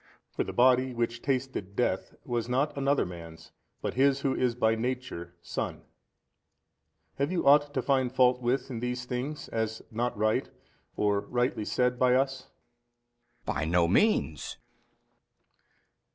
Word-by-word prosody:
For - - -1
the - - -5
Body 130 0 +3
which 115 0 -1
tasted 130 -8 -2
death, - - -1
was 120 -1 -2
not 135 +4 +1
another 140 0 +2
man's 85 -2 -10 0.3
but - - -1
His 135 +1 +3
who 135 -1 +1
is 125 -2 0
by 110 -2 +3
Nature 115 -7 -4
Son. - - -4 1.4
Have 140 +4 +1
you 180 - -1
ought 145 +1 +6
to 135 - -1
find 130 -3 +2
fault 125 -1 +3
with 125 +2 0
in 120 - -4
these 125 +1 -3
things 130 +5 -4
as 110 0 -2
not 120 +1 -2
right 110 +1 +1 0.5
or 105 -1 +2
rightly 120 0 -1
said 125 +4 +1
by 125 -1 +4
us? 135 0 0 1.0
B. - - -1
By 80 - -1
no 85 +1 +3
means. 90 - +1
125 Hz, 145 wpm, -29 LUFS, 110-135 Hz, 1.4 s, ought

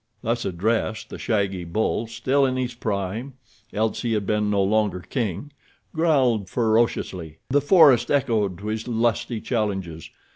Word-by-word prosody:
Thus 120 0 -1
addressed, 110 +4 -1
the - - -7
shaggy 100 -5 -1
bull, 110 +6 -1
still 130 +4 +1
in 130 -1 +1
his 125 -1 -2
prime—else 110 +1 -4
he 115 -2 -1
had 105 -2 -1
been 105 +1 0
no 100 -1 +2
longer 100 -2 +1
king—growled 130 - -1
ferociously. 110 -8 0
The 145 +1 +4
forest 145 -6 +5
echoed 110 -9 +1
to 100 - -10
his 110 +1 -3
lusty 115 0 0
challenges. 95 - -3
110 Hz, 135 wpm, -23 LUFS, 100-125 Hz, -, forest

